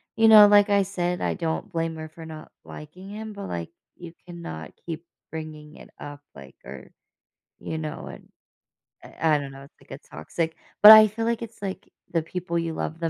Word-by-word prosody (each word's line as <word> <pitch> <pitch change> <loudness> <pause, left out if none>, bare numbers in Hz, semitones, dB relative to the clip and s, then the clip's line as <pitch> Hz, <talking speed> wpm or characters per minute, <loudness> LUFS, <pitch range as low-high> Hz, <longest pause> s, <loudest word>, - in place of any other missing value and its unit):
you 225 0 +4
know, 215 -2 +9
like 205 0 +5
I 200 -1 +3
said, 180 -2 -3
I - - -1
don't 165 -1 -4
blame 165 -1 -2
her 155 0 -8
for 160 +1 -12
not 155 -1 -10
liking 180 +6 -11
him, 215 +1 -7
but, 200 -1 -7
like, 85 -1 -5 0.3
you 170 -1 -11
cannot 165 - -8
keep 165 -1 -6 0.3
bringing 155 -1 -9
it - - -14
up, 145 0 -9 0.2
like, 70 -1 -13
or, 65 -1 -11 0.7
you 160 - -5
know, 155 -1 -6
and, - - -12 0.7
I 160 -1 0
I - - +3
don't 140 -1 -7
know, 135 0 -12
it's, 140 - -20
like, - - -16
a - - -27
toxic 160 - -3 0.3
but 210 - +13
I 215 0 +10
feel 215 +2 -5
like 230 0 -1
it's, 230 -2 -9
like, 195 -2 -6 0.2
the 165 - +1
people 170 +1 -4
you 165 -1 -3
love 160 +1 -5
the 165 -1 -1
165 Hz, 205 wpm, -25 LUFS, 155-200 Hz, 0.7 s, but